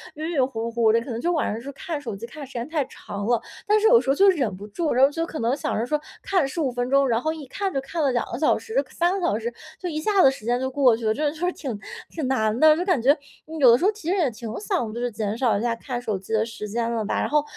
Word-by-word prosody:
晕 310 +2 -4
晕 275 -6 +2
糊 230 -3 -4
糊 230 -2 +3
的， 230 - +3
可 235 - -9
能 230 - -3
就 345 +8 0
晚 315 - 0
上 215 - -4
就 280 +3 -7
看 330 +1 -5
手 235 -7 -5
机 210 +4 -7
看 285 +4 -9
时 270 - -15
间 235 +1 -4
太 310 -4 0
长 200 -4 -7
了。 240 +1 +2 0.3
但 425 +1 +4
是 435 - +4
有 470 +1 +7
时 270 - -4
候 270 - +4
就 395 +5 +6
忍 260 - +1
不 200 +3 -9
住， 305 +9 -1
然 255 +2 +4
后 275 - +6
就 330 +2 -2
可 320 - -6
能 235 +3 +1
想 - - -2
着 225 - 0
说 300 +4 0 0.2
看 370 -7 +1
15 275 -2 -1
分 245 0 -2
钟， 275 0 +4
然 230 -2 +2
后 315 +2 -1
一 310 -3 -8
看 385 +8 -3
就 270 - 0
看 320 +5 -4
了 275 - +3
2 240 -1 +1
个 235 - -3
小 310 - +3
时， 465 +2 -1
3 345 +1 +1
个 355 - -1
小 210 - +1
时 235 +1 -3 0.3
就 360 - -4
一 310 -2 -3
下 400 +4 +3
子 270 - +7
时 265 -5 -10
间 240 +1 +1
就 260 0 -1
过 265 -3 +4
去 225 0 -6
了。 215 - +3
这 295 +4 0
就 - - -12
是 - - +1
挺 255 -8 -5 0.3
挺 310 -5 -3
难 220 -4 +1
的， 310 +1 +7
就 355 - -1
感 360 -10 +2
觉， 260 +4 +6 0.4
呃， 320 +1 -7
有 255 -4 +8
的 235 - +6
时 275 - -4
候 410 - +5
其 425 -6 -11
实 - - +2
也 325 -8 +2
挺 230 0 -8
想 365 - -2
就 235 - -5
是 245 0 -1
减 210 -1 -2
少 235 -5 +2
一 - - -3
下 235 0 0
看 245 +1 -5
手 215 -5 -2
机 195 - -13
的 220 0 +2
时 225 -2 -7
间 230 +2 -1
了 225 -2 -1
吧。 210 - -1
然 - - 0
后 300 0 +3
265 Hz, 340 characters per minute, -24 LUFS, 230-315 Hz, 0.4 s, 有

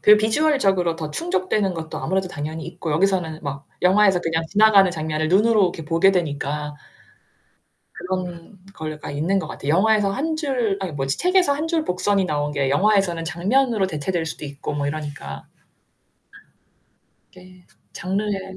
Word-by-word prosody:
그리고 210 0 +7
비주얼적으로 215 - +2
더 155 -2 -5
충족되는 195 - -1
것도 160 -1 -6
아무래도 190 +1 -1
당연히 155 0 -5
있고 170 -1 -6
여기서는 170 -2 0
막 140 0 -6 0.2
영화에서 190 0 +4
그냥 165 -1 -1
지나가는 205 -2 +5
장면을 155 -1 -2
눈으로 210 +4 +4
이렇게 170 -3 -3
보게 165 +5 +4
되니까. 150 -3 -2 1.2
그런 180 0 -5 0.2
거가 155 -4 -6
있는 160 +7 0
것 175 -5 -3
같아. 140 - -8
영화에서 205 +5 +3
한 315 +9 -2
줄 255 -10 -1
아니 185 -3 -3
뭐지? 135 -1 -2
책에서 360 -4 +3
한 305 +3 -3
줄 325 -2 0
복선이 190 +1 +1
나온 150 -2 -1
게 140 -2 0
영화에서는 195 -1 +2
장면으로 200 +7 +1
대체될 165 +1 -2
수도 155 - -6
있고 140 +1 -6
뭐 145 -1 -2
이러니까. 145 - -6 1.9
이게 185 -1 -17 0.3
장르에. 195 0 -3
180 Hz, 355 characters per minute, -22 LUFS, 155-205 Hz, 1.9 s, 그리고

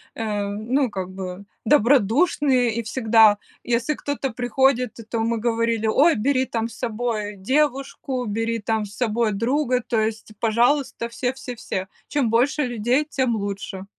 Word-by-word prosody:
э, 210 -2 -2
ну, 230 +6 0
как 190 -2 -5
бы, 185 0 -6 0.2
добродушные 255 - +3
и 235 - -1
всегда, 220 -2 +4 0.3
если 240 +5 0
кто-то 280 -2 -3
приходит, 250 +2 +1
т 230 - -10
то 230 +1 -4
мы 230 +1 0
говорили: 230 -1 0
"Ой, 305 +9 +4
бери 260 +4 +1
там 225 -2 -2
с 230 - -12
собой 220 -3 -3
девушку, 265 +2 -1
бери 225 +2 -1
там 220 0 -1
с 205 0 -12
собой 230 -2 0
друга, 250 +3 +1
то 225 - +1
есть, 220 0 -3
пожалуйста, 235 +2 +1
все-все-все. 245 -6 -4 0.2
Чем 280 -6 0
больше 275 +6 +2
людей, 245 +4 0
тем 260 -5 0
лучше." 200 -2 -5
235 Hz, 145 wpm, -23 LUFS, 215-260 Hz, 0.3 s, всегда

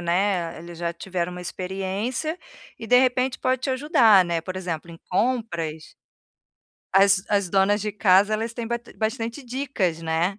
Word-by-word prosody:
né, 175 -1 0
eles 170 0 -10
já 170 0 -2
tiveram 180 0 -4
uma 180 - -7
experiência, 195 - -3 0.4
e, 225 - -7
de 250 - +5
repente, 255 0 +2
pode 255 -1 0
te 275 - -1
ajudar, 255 - +5
né, 170 -1 -1
por 185 +3 -6
exemplo 170 -3 -4
em 165 - -10
compras 175 -9 -1 1.0
as 195 -1 +5
as 200 -3 +1
donas 200 +2 +3
de 210 -1 -3
casa 200 0 +4
elas 220 +2 -1
têm 235 -2 -4
bat 235 +1 -4
bastante 230 +3 -3
dicas, 240 - -2
né, 165 +4 -1
195 Hz, 160 wpm, -24 LUFS, 175-235 Hz, 1.0 s, de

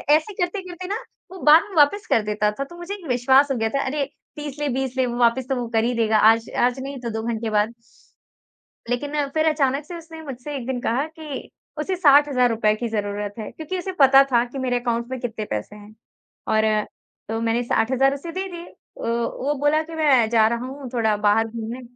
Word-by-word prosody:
ऐसे 315 +7 -1
करते-करते 365 -1 -4
ना, 410 +3 -2 0.3
वो 375 - -9
बाद 310 +4 +7
में 390 - -10
वापस 395 +9 +4
कर 225 - +4
देता 210 0 0
था 275 - 0
तो 310 +5 -12
मुझे 345 +3 -6
एक 375 - -13
विश्वास 265 +3 +4
हो - - +1
गया 225 -1 0
था 275 +4 -1
अरे 280 +1 -1 0.3
30 295 -1 -7
ले 295 - -1
20 265 0 -2
ले 260 - +3
वापिस 240 +1 +1
तो 265 - +1
वो 245 -2 -3
कर 225 0 +3
ही 245 - +1
देगा। 220 -1 +2
आज 225 +2 +4
आज 245 +2 +2
नहीं 270 0 -6
तो 235 - -4
2 220 0 -4
घंटे 225 -1 -2
बाद। 215 +2 +1 1.2
लेकिन 285 +3 -1
फिर 315 0 +2
अचानक 285 -1 0
से 345 +1 -7
उसने 325 -1 -11
मुझसे 280 0 -7
एक 255 - -5
दिन 260 -2 -2
कहा 250 +6 0
कि 295 -4 -7 0.3
उसे 370 +5 -1
₹60,000 270 -9 +4
की 235 +2 -3
जरूरत 205 -1 -3
है 215 - -5
क्योंकि 320 +4 -5
उसे 380 +1 -4
पता 270 0 +8
था 235 -1 +4
कि 250 +3 -9
मेरे 250 -1 0
अकाउंट 235 -1 -2
में 260 - -3
कितने 225 -3 -4
पैसे 105 - -5
हैं 210 +1 -14 0.5
और, 215 -1 +2 0.4
तो 225 0 -2
मैंने 230 +1 +1
60,000 260 +4 +2
उसे 310 +4 -6
दे 380 +2 -3
दिए 345 0 -8
अ, - - -16 0.3
वो 235 +4 -1
बोला 290 +2 +3
कि, 325 +1 -9
"मैं 270 -8 +4
जा 220 -1 +4
रहा 235 +2 -2
हूँ 270 0 -8
थोड़ा 220 -3 +2
बाहर 210 +2 +2
घूमने।" 230 +2 -6
255 Hz, 215 wpm, -23 LUFS, 225-295 Hz, 1.2 s, पता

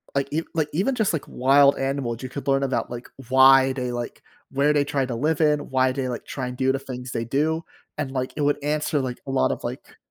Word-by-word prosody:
like 140 0 +1
e 160 - +1
like 155 -2 0
even, 205 - +1
just, 220 -7 +1
like, 155 - -3
wild 140 +2 +4
animals, 135 -3 -2
you 130 - -5
could 140 +1 -7
learn 135 0 +2
about, 135 - -1
like, 120 0 -7 0.2
why 135 0 +7
they 125 -2 -3
like 120 0 -5 0.3
where 140 +2 +2
they 145 -1 +3
try 135 -2 0
to 125 - -4
live 155 +5 0
in, 150 -1 +2
why 130 -1 +2
they 130 -1 -2
like 120 -2 -5
try 130 -2 -4
and 125 - -6
do 130 0 +2
the 135 - -1
things 125 -1 -7
they 115 -1 -2
do 155 +6 0 0.4
and, 135 -2 -2
like, 130 -1 -3
it - - -1
would 145 0 +1
answer, 150 0 0
like, 125 -2 -3
a - - -3
lot 135 - +2
of, - - -5
like - - -7
135 Hz, 250 wpm, -24 LUFS, 130-145 Hz, 0.4 s, why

